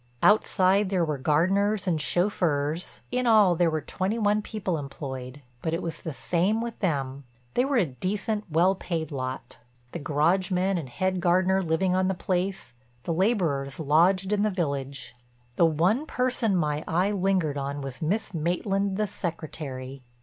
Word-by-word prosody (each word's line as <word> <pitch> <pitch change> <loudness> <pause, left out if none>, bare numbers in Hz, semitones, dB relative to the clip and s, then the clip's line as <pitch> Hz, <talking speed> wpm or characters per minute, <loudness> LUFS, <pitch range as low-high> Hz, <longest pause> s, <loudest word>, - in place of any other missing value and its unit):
Outside 200 -1 +4
there 185 -3 +1
were 150 -3 -2
gardeners 195 +8 +2
and 165 -5 0
chauffeurs—in 175 - -1
all 210 -5 +6
there 170 0 +3
were 155 -1 -1
twenty 195 +8 -2
one 210 -1 +2
people 195 -6 -3
employed—but 135 0 -6
it 170 - -3
was 165 - -5
the 160 - -4
same 180 +9 0
with 235 0 -5
them. 140 -6 -1 0.3
They 250 - +2
were 275 -1 +1
a 210 - +4
decent, 205 - -3
well 170 +5 +4
paid 165 -5 -4
lot, 130 -3 -5 0.3
the 170 - -5
garage 165 +5 +1
men 185 0 +1
and 140 -6 -7
head 185 +7 -1
gardener 185 +2 +3
living 180 +2 +1
on 185 0 +2
the 190 - 0
place, 185 -4 -2 0.3
the 170 - -1
laborers 165 - 0
lodged 180 +6 +3
in 205 - +1
the 215 - +2
village. 140 -8 -3 0.4
The 170 - +5
one 180 - +1
person 250 -6 0
my 150 -3 0
eye 180 +5 +1
lingered 185 -7 +1
on 140 +1 -4
was 135 -2 -7
Miss 195 +6 -1
Maitland 190 +4 0
the 215 - +1
Secretary. 140 -8 -6
175 Hz, 160 wpm, -26 LUFS, 150-195 Hz, 0.4 s, all